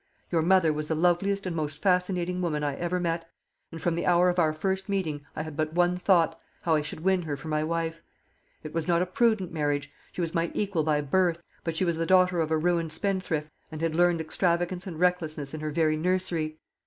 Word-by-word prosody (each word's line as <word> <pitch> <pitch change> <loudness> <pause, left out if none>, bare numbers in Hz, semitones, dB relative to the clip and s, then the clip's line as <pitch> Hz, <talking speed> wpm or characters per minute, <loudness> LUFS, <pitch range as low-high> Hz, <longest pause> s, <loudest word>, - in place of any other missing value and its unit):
Your 165 -2 +3
mother 170 -2 +4
was 150 0 -3
the 160 - 0
loveliest 180 +4 +1
and 180 -2 -2
most 150 -2 -3
fascinating 180 -1 +1
woman 150 -4 -1
I 145 -2 -1
ever 175 +3 -1
met, 165 -1 -2 0.4
and 165 - -7
from 170 +1 0
the 170 - -2
hour 180 0 +5
of 180 0 0
our 160 -2 +4
first 190 +5 -2
meeting 160 -7 -1
I 155 - -2
had 155 -2 -7
but 155 +1 -1
one 175 +1 +3
thought 175 -3 +2 0.2
how 165 - +2
I 155 - +3
should 150 +1 -7
win 190 +1 +2
her 150 -4 -4
for 155 - -8
my 155 0 +1
wife. 165 0 -2 0.6
It 155 - -7
was 165 -1 -2
not 170 0 +3
a - - -1
prudent 205 -1 +1
marriage. 145 -3 -1 0.2
She - - -4
was 165 -1 -2
my 165 0 +1
equal 195 -5 0
by 150 -1 +2
birth; 170 +3 +1 0.2
but 165 -1 -2
she 185 - +2
was 170 -2 0
the 165 0 -1
daughter 185 -1 +4
of 160 - -1
a 160 - +2
ruined 165 0 +1
spendthrift, 165 -4 -2 0.2
and 155 - -6
had 165 0 0
learnt 175 0 +3
extravagance 175 +3 0
and 165 -4 -6
recklessness 160 -5 0
in 155 - -4
her 155 0 -3
very 155 0 +1
nursery. 165 -2 -1
165 Hz, 230 wpm, -27 LUFS, 155-180 Hz, 0.6 s, hour